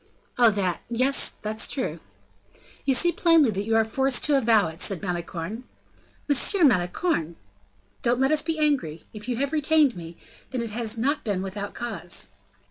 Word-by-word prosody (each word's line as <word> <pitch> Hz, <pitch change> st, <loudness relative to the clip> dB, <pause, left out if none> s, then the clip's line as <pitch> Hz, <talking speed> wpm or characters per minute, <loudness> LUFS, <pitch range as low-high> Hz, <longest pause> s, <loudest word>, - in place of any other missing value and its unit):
"Oh, 240 Hz, -2 st, +7 dB
that, 190 Hz, -5 st, -1 dB
yes, 255 Hz, +4 st, +3 dB
that's 215 Hz, +1 st, -1 dB
true." 260 Hz, -, -3 dB, 0.9 s
"You 270 Hz, -, +3 dB
see 345 Hz, +6 st, +3 dB
plainly 330 Hz, -8 st, +4 dB
that 200 Hz, 0 st, -3 dB
you 225 Hz, 0 st, +1 dB
are 225 Hz, 0 st, +4 dB
forced 265 Hz, +3 st, 0 dB
to 295 Hz, -, +2 dB
avow 225 Hz, -7 st, +4 dB
it," 160 Hz, +3 st, -10 dB
said 195 Hz, -5 st, -1 dB
Malicorne. 180 Hz, +5 st, -4 dB, 0.6 s
"Monsieur 330 Hz, +6 st, +2 dB
Malicorne!" 180 Hz, -, +1 dB, 0.7 s
"Don't 240 Hz, +1 st, +1 dB
let 270 Hz, +2 st, +2 dB
us 305 Hz, -1 st, +3 dB
be 320 Hz, +1 st, -2 dB
angry; 270 Hz, -, 0 dB
if 215 Hz, +2 st, -8 dB
you 245 Hz, -, -1 dB
have 280 Hz, +3 st, -2 dB
retained 305 Hz, -2 st, +3 dB
me, 170 Hz, -1 st, -9 dB, 0.3 s
then 250 Hz, -3 st, -3 dB
it 230 Hz, -, -5 dB
has 230 Hz, 0 st, -2 dB
not 280 Hz, +6 st, 0 dB
been 195 Hz, -4 st, -2 dB
without 200 Hz, +1 st, -6 dB
cause." 215 Hz, -7 st, -6 dB
235 Hz, 170 wpm, -25 LUFS, 200-280 Hz, 0.9 s, Oh